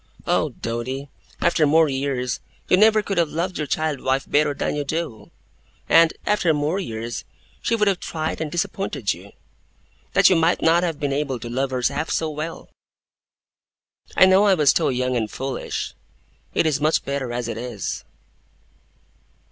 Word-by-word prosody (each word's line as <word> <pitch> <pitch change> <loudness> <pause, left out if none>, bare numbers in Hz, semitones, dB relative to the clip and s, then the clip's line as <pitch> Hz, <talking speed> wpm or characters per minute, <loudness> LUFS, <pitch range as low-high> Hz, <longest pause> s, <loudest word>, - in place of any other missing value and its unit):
'Oh, - - +1
Doady, 130 +4 -4 0.3
after 165 -3 +3
more 160 +2 +5
years, 135 -2 -2 0.3
you - - +5
never 215 +2 +5
could 195 -3 -1
have 165 -3 +2
loved 175 +3 -2
your 150 - -2
child 155 -2 -1
wife 135 +1 0
better 145 0 +2
than - - -1
you 145 - -1
do; 140 -8 -4 0.6
and, 165 0 +6
after 180 -6 +2
more 150 +6 0
years, 115 - -5 0.4
she 230 - +1
would 210 -2 +2
so - - +6
have 185 - -4
tried 160 0 -3
and 155 -2 -3
disappointed 175 +3 -1
you, - - -13 0.8
that - - +6
you 185 - +5
might 165 +1 +3
not 165 +1 +5
have 165 -4 -2
been 145 -2 -1
able 140 -2 -1
to 115 +1 -7
love 135 +2 0
her 130 -1 -3
half 145 +3 -3
so 160 -1 0
well! 155 +2 -6 1.5
I - - +8
know 190 +2 +5
I 195 -2 +5
was 150 -5 +4
too - - +2
young 125 0 0
and 110 -3 -1
foolish. 135 +4 -4 0.6
It - - +3
is 150 -3 +1
much 155 +2 +2
better 140 -3 -2
as 120 -1 -3
it 115 - -4
is! 120 -4 -4
150 Hz, 175 wpm, -22 LUFS, 130-165 Hz, 1.5 s, I